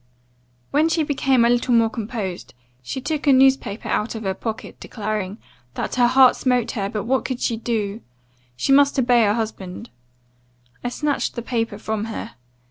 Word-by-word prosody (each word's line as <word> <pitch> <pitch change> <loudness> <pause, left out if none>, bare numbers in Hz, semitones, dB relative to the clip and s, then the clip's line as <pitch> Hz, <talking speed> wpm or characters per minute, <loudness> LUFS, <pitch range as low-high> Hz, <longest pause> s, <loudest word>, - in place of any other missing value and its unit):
"When 305 +3 +3
she 325 -1 +1
became 270 -4 +2
a - - +4
little 245 0 +2
more 230 -1 +5
composed, 210 - -5 0.3
she 130 - -5
took 300 +2 -3
a - - +7
newspaper 265 -5 +3
out 215 +2 -1
of 220 - -5
her 190 -1 -1
pocket, 220 +3 -6
declaring, 210 -2 -4 0.4
'that - - -3
her 245 -1 +4
heart 255 +1 +6
smote 250 -3 +1
her, 200 -4 -2
but 210 0 -3
what 260 +2 +1
could 255 -2 -3
she 235 - 0
do? 220 -2 -3 0.5
she 200 - -1
must 285 +1 +5
obey 245 -2 +4
her 205 +1 +2
husband.' 220 -2 -5 0.9
I 245 - -1
snatched 290 +3 -2
the 235 - -4
paper 230 -4 -2
from 215 0 -3
her. 225 - -6
235 Hz, 175 wpm, -22 LUFS, 215-260 Hz, 0.9 s, a